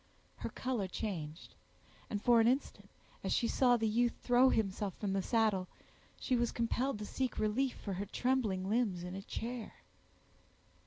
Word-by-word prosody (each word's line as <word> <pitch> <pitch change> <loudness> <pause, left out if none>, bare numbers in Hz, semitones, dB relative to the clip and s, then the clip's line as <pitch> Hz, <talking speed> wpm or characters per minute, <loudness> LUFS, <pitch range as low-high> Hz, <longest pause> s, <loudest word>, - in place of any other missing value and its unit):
Her - - -4
color 250 -7 -2
changed, 175 -6 -5 0.6
and 205 - -1
for 235 -1 +6
an 225 - +4
instant, 260 +4 -1 0.3
as - - -1
she 235 - +2
saw 245 -1 +4
the 225 -1 0
youth 235 +2 +2
throw 250 +1 +5
himself 200 -3 0
from 200 -2 -2
the 195 - +1
saddle, 215 -4 +1 0.5
she 255 - +1
was 240 -1 +1
compelled 240 +2 0
to 210 - -5
seek 260 +3 -2
relief 240 +5 +1
for 200 - -5
her 195 +2 -3
trembling 215 -6 0
limbs 205 -5 +1
in 180 0 -5
a 195 - -5
chair. 230 +3 -5
225 Hz, 165 wpm, -34 LUFS, 195-245 Hz, 0.6 s, for